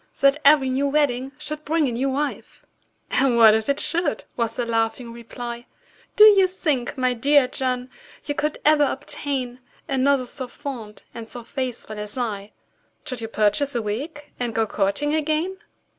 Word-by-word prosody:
That 275 +2 +4
every 280 -2 +5
new 275 +2 +1
wedding 275 -3 +1
should 300 0 -6
bring 310 -1 +1
a - - -1
new 255 +4 -1
wife!" 285 +2 -4 0.5
"And 265 -3 +2
what 220 -2 +8
if 220 +2 0
it 280 - +1
should?" 335 -3 0
was 230 -1 -1
the 245 - -1
laughing 230 +1 -1
reply; 235 0 -8 0.5
"Do 420 - +7
you 400 -3 +8
think, 300 -9 -2
my 255 -1 +1
dear 275 +3 +4
John, 250 -1 -2 0.4
you 290 - -2
could 300 +1 -2
ever 300 -1 +5
obtain 265 -3 -3 0.3
Another 270 -1 +2
so 255 +1 -5
fond 240 -6 -8
and 225 -1 -8
so 240 - -7
faithful 245 -4 -5
as 210 +3 -6
I, 210 -4 -3 0.5
Should 255 -3 -5
you 225 - -4
purchase 220 +6 +1
a 235 - +1
wig, 290 +8 -5
and 240 -2 -3
go 225 - +2
courting 215 +9 -1
again?" 315 +4 0
260 Hz, 170 wpm, -23 LUFS, 235-290 Hz, 0.5 s, what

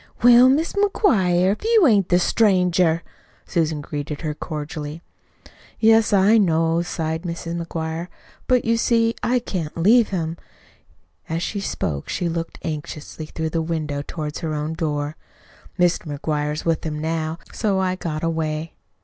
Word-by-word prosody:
"Well, 245 +1 +8
Mis' 305 +5 +1
McGuire, 195 - +3
if 210 - -4
you 445 -4 +5
ain't 205 - +4
the 175 - +5
stranger!" 180 -4 +2 0.4
Susan 160 -3 0
greeted 145 0 -5
her 155 -2 -2
cordially. 150 +1 -6 0.8
"Yes, 225 0 +5
I 205 +3 +5
know," 165 -3 +2
sighed 160 -2 -3
Mrs. 170 -1 -4
McGuire. 165 +1 -4 0.4
"But, 250 -1 +3
you 230 0 +2
see, 230 0 +2
I 250 +1 +2
can't 180 -11 -4
leave 220 +7 +5
him." 165 -3 -3 0.9
As 165 +1 -2
she 205 - -3
spoke 75 - -3
she 175 - -1
looked 165 0 -4
anxiously 155 -1 -6
through 160 0 -4
the 165 - 0
window 155 -3 -2
toward 150 0 -5
her 155 -2 -3
own 150 +2 -2
door. 150 -2 -2 0.6
"Mr. 175 -4 +1
McGuire's 150 0 -2
with 165 -2 0
him, 155 -2 -3
now, 160 +1 -2 0.2
so 205 -3 0
I 185 -1 0
got 160 -4 -4
away." 160 -1 -2
165 Hz, 150 wpm, -22 LUFS, 155-195 Hz, 0.9 s, Well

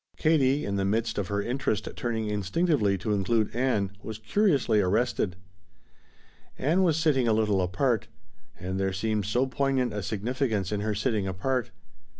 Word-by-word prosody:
Katie, 145 -3 +2
in 100 0 -2
the 100 - 0
midst 110 +2 0
of 100 - -2
her 100 +1 -1
interest 120 -4 -1
turning 115 -2 -2
instinctively 105 - +1
to 105 +4 -2
include 105 +3 0
Ann, 120 -6 +1
was 110 -1 -6
curiously 135 - +2
arrested. 100 -1 0 1.2
Ann 165 +7 +2
was 165 -5 +3
sitting 145 -6 +2
a 110 - +4
little 105 -3 +2
apart. 100 +6 0 0.5
And 95 +1 -3
there 95 0 0
seemed 105 +1 -1
so 120 +5 +2
poignant 130 -1 0
a 105 - -3
significance 110 -1 -2
in 105 -1 -1
her 105 0 -1
sitting 105 -2 0
apart. 120 +7 -1
110 Hz, 155 wpm, -27 LUFS, 100-130 Hz, 1.2 s, a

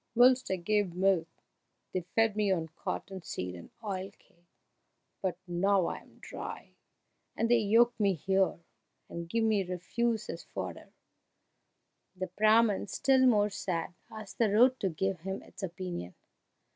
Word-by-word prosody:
Whilst 255 +2 +5
I 190 - +1
gave 190 0 0
milk 185 -3 +2 0.7
they 185 - 0
fed 225 -2 +3
me 210 -2 +2
on 165 -3 0
cotton 190 +4 -5
seed 90 - -5
and 85 -1 -10
oil 195 -2 -3
cake, 175 0 -30 0.7
but 185 -3 -1
now 185 +1 +2
I - - -2
am - - -21
dry - - -8 0.6
they 230 +1 +3
yoke 230 +3 +4
me 200 -2 +3
here, 190 +2 +1 0.5
and 170 0 -6
give 230 +4 +1
me 215 -3 +2
refuse 215 +6 -2
as - - -6
fodder!" - - -7 1.2
The 185 0 -3
Brahman, 215 -1 +4
still 260 +4 +3
more 210 -3 +4
sad, 175 -3 -3 0.2
asked 215 -2 -10
the 225 -4 +3
road 250 +5 +5
to 195 - 0
give 190 +2 -2
him 190 +3 -5
its - - -13
opinion. 175 - -5
195 Hz, 145 wpm, -31 LUFS, 180-220 Hz, 1.2 s, Whilst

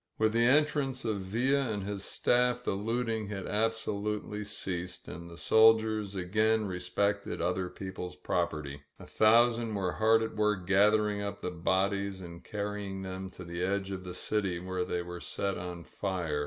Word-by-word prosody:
With 110 0 +2
the 115 +1 +3
en 145 +5 +6
trance 135 -4 -3
of 110 -3 0
Villa 125 +7 +1
and 105 -3 -2
his 100 0 -4
staff 125 +2 +2
the - - 0
looting 115 +1 -1
had 100 -2 -5
absolutely 105 -1 -1
ceased 90 -3 -4
and 85 +4 -8
the 85 - -11
soldiers 110 -2 +4
again 110 +4 +2
respected 100 +2 -1
other 90 +1 0
people's 95 -2 -6
property. 75 -5 -2 0.2
A - - -11
thousand 115 0 +4
were 95 -3 0
hard 110 +2 +4
at 110 - -4
work 105 -4 +1
gathering 105 +2 +3
up 100 0 -4
the 90 - -3
bodies 95 +3 0
and 85 -2 -9
carrying 100 -2 -4
them 95 0 -5
to 90 - -10
the 85 0 -5
edge 100 +1 -1
of 95 -1 -5
the 90 -1 -7
city, 100 -3 -1
where 90 +1 -2
they 90 -1 -2
were 90 0 -7
set 100 -2 -2
on 90 -1 -6
fire. 90 -7 -2
100 Hz, 170 wpm, -31 LUFS, 90-110 Hz, 0.2 s, en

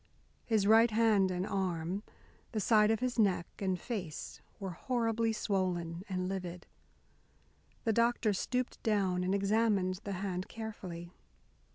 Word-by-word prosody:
His 220 -4 +2
right 225 +3 +6
hand 215 -3 +4
and 180 0 -1
arm, 185 -1 -1 0.5
the 220 - 0
side 210 0 +4
of 225 +1 +1
his 250 -1 -1
neck 190 -5 +3
and 185 -2 0
face 190 -10 -5 0.2
were 195 -2 -4
horribly 230 +1 0
swollen 180 -5 -1
and 185 -1 -1
livid. 180 -2 -5 1.2
The 225 - +2
doctor 235 -1 +2
stooped 250 +6 -2
down 195 -4 +1
and 185 +2 +1
examined 200 -2 +2
the 200 - -3
hand 185 -1 -3
carefully. 185 -6 -7
200 Hz, 135 wpm, -33 LUFS, 185-225 Hz, 1.2 s, right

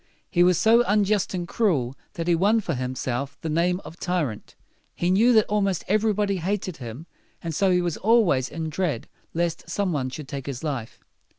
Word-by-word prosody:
He 175 - +3
was 180 -1 +5
so 225 +6 +5
unjust 205 -1 +2
and 175 -1 -3
cruel 145 - 0 0.2
that 165 0 -4
he 175 - +4
won 200 +7 +3
for 215 - -2
himself 130 +1 -3
the 160 - -3
name 175 +3 +1
of 165 - -11
tyrant. 160 - -2 0.4
He 175 +1 0
knew 225 +6 +5
that 220 -2 +5
almost 200 -4 0
everybody 210 -1 +1
hated 185 -1 -2
him, 120 +5 -8 0.4
and 165 -1 -3
so 195 +5 +2
he 180 -1 +3
was 175 -3 -2
always 200 - +3
in 160 0 -4
dread 155 -7 -2 0.3
lest 170 -1 -2
some 200 -4 0
one 130 -3 -1
should 145 +2 -8
take 140 -1 -6
his 135 -1 -5
life. 135 -7 -4
175 Hz, 190 wpm, -25 LUFS, 145-200 Hz, 0.4 s, was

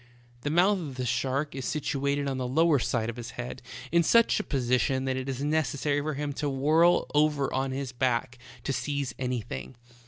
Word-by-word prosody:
The 145 - -2
mouth 185 +5 +4
of 145 -7 -6
the 130 0 -3
shark 130 +4 -1
is 135 0 -5
situated 140 0 -1
on 135 -1 -2
the 125 - -2
lower 155 +2 +3
side 115 -2 0
of 115 0 -5
his 120 -1 -6
head 125 +1 -5 0.3
in 170 +1 +5
such 230 +8 +4
a - - -2
position 130 -1 +1
that 130 -1 0
it 130 +1 -4
is 135 +1 -3
neces 150 -1 0
sary 145 +1 0
for 155 0 -3
him 145 0 -3
to 145 - 0
whirl 155 +6 +3
over 150 -2 +2
on 135 +1 0
his 135 -1 -3
back 125 -1 -1 0.2
to 135 - -1
seize 135 0 -2
anything. 115 - -4
135 Hz, 205 wpm, -28 LUFS, 125-150 Hz, 0.3 s, in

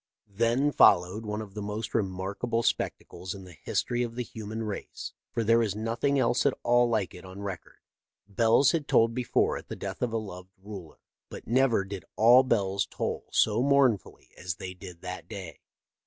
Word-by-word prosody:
Then 120 +7 +2
followed 100 0 +4
one 105 +1 -3
of 100 -2 -13
the 105 - -5
most 105 +2 -4
remarkable 100 +3 -1
spectacles 95 -4 -2
in 95 - -10
the 90 -1 -12
history 120 +9 -2
of 115 -1 -3
the 125 - -2
human 110 -1 -6
race, 105 -2 -6 0.2
for 115 - -1
there 115 +1 +4
is 105 -4 -1
nothing 115 +6 0
else 125 -1 +2
at 140 - +1
all 120 0 +4
like 110 -5 0
it 90 - -11
on 95 +2 -9
record. 95 -4 -7 0.5
Bells 115 +6 +4
had 155 -4 -1
tolled 115 0 +4
before 125 0 +1
at - - -10
the - - -6
death 95 -1 -6
of 125 -2 0
a 115 - 0
loved 95 -3 -8
ruler, 95 -5 -10 0.3
but - - -9
never 120 -4 +2
did 100 -1 -7
all 120 +4 +7
bells 100 -6 0
toll - - -4
so 110 +2 +3
mournfully 135 -6 +2
as 90 -1 -3
they 90 +1 -7
did 90 -2 -11
that 90 -1 -7
day. 95 -7 -8
110 Hz, 185 wpm, -28 LUFS, 95-120 Hz, 0.5 s, all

